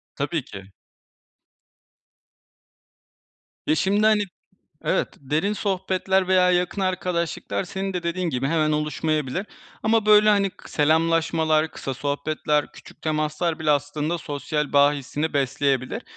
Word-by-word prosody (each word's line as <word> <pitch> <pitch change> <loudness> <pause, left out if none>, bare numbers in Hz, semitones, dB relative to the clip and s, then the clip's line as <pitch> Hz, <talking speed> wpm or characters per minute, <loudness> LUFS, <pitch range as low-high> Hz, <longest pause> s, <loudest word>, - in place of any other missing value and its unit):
Tabii 145 0 -2
ki. 95 -3 -11 3.0
Ya - - +3
şimdi, 200 +5 +2
hani 215 -1 +4 0.6
Evet, - - +1
derin 155 +9 0
sohbetler 190 -2 0
veya 185 -1 +4
yakın 180 +2 0
arkadaşlıklar 170 - -2
senin 195 0 -4
de 180 -1 -3
dediğin 170 +1 -1
gibi 130 -1 -1
hemen 155 0 +1
oluşmayabilir. 150 +2 -1 0.4
Ama, 220 -1 +2
böyle, 210 0 +7
hani, 200 -2 +3
k - - -16
selamlaşmalar, 160 0 +2
kısa 135 - -5
sohbetler, 150 +2 -1
küçük - - -15
temaslar 155 +2 -1
bile 155 -1 +1
aslında 150 +3 0
sosyal 150 0 -3
bağ 145 0 +5
hissini 145 +2 -3
besleyebilir. 135 -2 0
155 Hz, 120 wpm, -24 LUFS, 145-185 Hz, 3.0 s, böyle